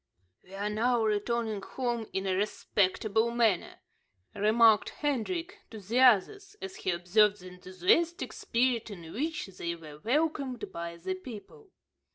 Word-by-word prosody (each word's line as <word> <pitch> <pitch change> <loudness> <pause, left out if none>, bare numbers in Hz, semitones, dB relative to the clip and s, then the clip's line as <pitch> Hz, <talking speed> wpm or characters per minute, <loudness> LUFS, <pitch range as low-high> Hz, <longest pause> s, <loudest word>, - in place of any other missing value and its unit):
"We 190 - -13
are 200 +1 -2
now 230 +3 +1
returning 215 0 -1
home 240 0 -3
in 190 0 -2
a 190 - +1
respectable 210 +2 +1
manner," 230 -6 0 0.5
remarked 215 +1 +4
Hendrik 330 - -3
to 220 - -9
the 215 +5 -1
others, 325 - +4
as 385 -1 -7
he - - -3
observed 200 +4 +3
the 185 - -9
enthusiastic 185 - 0
spirit 240 -1 0
in 170 -5 -9
which 310 +6 -2
they 170 -3 -5
were 155 -3 -12
welcomed 275 - -1
by 170 0 -6
the 185 +3 -3
people. 245 - -11
220 Hz, 140 wpm, -30 LUFS, 190-255 Hz, 0.5 s, remarked